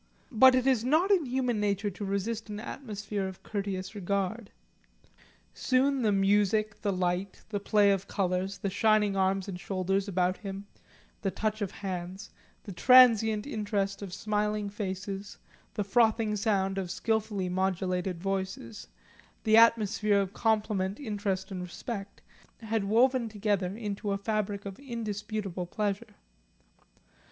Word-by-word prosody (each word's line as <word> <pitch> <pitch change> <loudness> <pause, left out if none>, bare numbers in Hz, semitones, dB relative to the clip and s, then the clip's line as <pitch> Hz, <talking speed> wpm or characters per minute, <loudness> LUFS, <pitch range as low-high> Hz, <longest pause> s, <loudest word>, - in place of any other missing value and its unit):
But 255 +2 +7
it 255 0 +1
is 255 -4 +3
not 315 +10 +3
in 350 -8 +3
human 250 -3 0
nature 205 0 0
to 195 - -7
resist 205 +3 -2
an 210 0 -5
atmosphere 205 -5 -4
of 190 -1 -9
courteous 195 -2 -4
regard. 200 +2 -2 1.0
Soon 265 +1 +1
the 215 -3 +2
music, 205 +2 +2
the 205 - 0
light, 185 +1 -2
the 205 -2 -2
play 205 0 +4
of 195 0 -1
colours, 190 0 -1
the 200 - -2
shining 210 0 +3
arms 190 0 +1
and 180 -2 -5
shoulders 195 +1 -1
about 185 -1 +1
him, 195 -1 -7 0.6
the 195 - 0
touch 215 +3 -2
of 200 - -1
hands, 185 +1 -6 0.3
the 200 - -8
transient 220 0 +6
interest 205 -6 -2
of 200 -3 -6
smiling 210 +1 -1
faces, 195 0 -5 0.4
the 205 - 0
frothing 220 +1 +2
sound 195 -2 0
of 185 -2 -4
skilfully 210 -1 -1
modulated 185 -1 -1
voices, 190 - -4 0.6
the 220 0 +4
atmosphere 220 -2 +4
of 195 0 -2
compliment, 210 -3 0
interest 200 -6 -3
and 185 -1 -4
respect, 195 +3 -7 0.4
had 220 -2 -1
woven 240 +3 +3
together 205 -3 -1
into 210 -2 -4
a - - 0
fabric 205 -1 -2
of 195 -1 -7
indisputable 215 -7 -4
pleasure. 205 +1 -3
205 Hz, 140 wpm, -29 LUFS, 195-220 Hz, 1.0 s, But